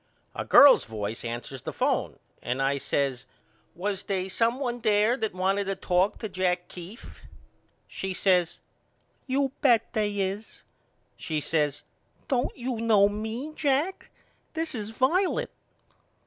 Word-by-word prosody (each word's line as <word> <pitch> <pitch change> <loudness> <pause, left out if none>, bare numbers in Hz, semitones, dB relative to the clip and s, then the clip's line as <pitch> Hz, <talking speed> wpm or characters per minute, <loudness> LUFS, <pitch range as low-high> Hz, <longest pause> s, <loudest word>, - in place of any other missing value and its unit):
A - - -4
girl's 285 -1 +8
voice 110 0 -5
answers 120 +2 -5
the - - -5
phone - - -1 0.2
and 125 +2 -2
I 135 +1 +1
says 135 -2 -1 0.5
Was 195 +2 -2
they 190 -2 -2
some 230 +6 +1
one 245 -3 -2
there 215 +1 +3
that 220 -7 -3
wanted 195 +2 +1
to 195 0 -2
talk 185 +3 +1
to 220 - -5
Jack 180 -2 -1
Keefe? 185 +7 -11 0.7
She 190 - -5
says 180 -2 +2 0.7
You 270 0 +1
bet 240 -5 +3
they 210 -2 -1
is. 195 +3 -4 0.5
She 155 -2 -2
says 150 -2 -1 0.4
Don't 260 -2 -1
you 245 -2 -3
know 215 -3 +5
me, 220 +8 -5
Jack? 300 +5 -1 0.5
This 325 0 -2
is 215 -3 -5
Violet. 360 - +1
205 Hz, 135 wpm, -27 LUFS, 180-245 Hz, 0.7 s, girl's